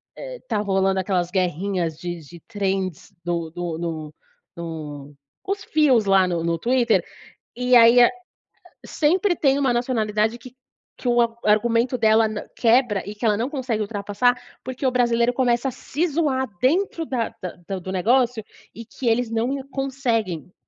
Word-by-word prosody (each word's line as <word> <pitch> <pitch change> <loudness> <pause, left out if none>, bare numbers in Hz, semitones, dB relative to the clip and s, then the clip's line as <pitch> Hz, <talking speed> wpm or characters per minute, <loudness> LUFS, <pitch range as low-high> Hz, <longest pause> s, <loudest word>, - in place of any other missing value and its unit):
eh, - - -8
tá - - -1
rolando 195 -1 +1
aquelas 180 -2 -1
guerrinhas 180 -2 -1
de 175 -1 -5
de 170 +3 -13
trends 195 -5 -3
no 170 -2 -2
no 175 -2 -3
no 160 -3 -5 0.4
no 150 -4 -7 0.3
os 395 +1 -3
fios 275 -8 +3
lá 195 -1 +4
no 170 -2 -2
no 170 0 0
Twitter. 240 +3 +2 0.5
E 250 +1 0
aí 235 +1 +8
a 240 - +7 0.8
sempre 350 +5 +2
tem 275 -2 +2
uma 270 -3 +2
nacionalidade 225 -2 0
que 255 +1 -13 0.4
que 250 - -4
o 240 0 +4
ar 230 -1 +1
argumento 230 +4 +2
dela 220 0 +4
n 215 -1 -4 0.2
quebra 230 -4 +3
e 205 - -7
que 225 - -2
ela 210 - +3
não 240 +6 -2
consegue 250 -7 -2
ultrapassar, 205 +3 0 0.3
porque 260 +1 -3
o - - +3
brasileiro 240 -1 +2
começa 245 0 +1
a - - -1
se 315 +9 -2
zoar 285 -4 0 0.2
dentro 330 +4 +1
da 245 -6 -3 0.3
da 195 -1 -3
do 185 - -7
negócio 235 +3 +2 0.3
e 230 - -9
que 245 +2 -4
eles 230 +1 +1
não 230 +2 0 0.2
conseguem 235 - -2
225 Hz, 165 wpm, -23 LUFS, 190-255 Hz, 0.8 s, aí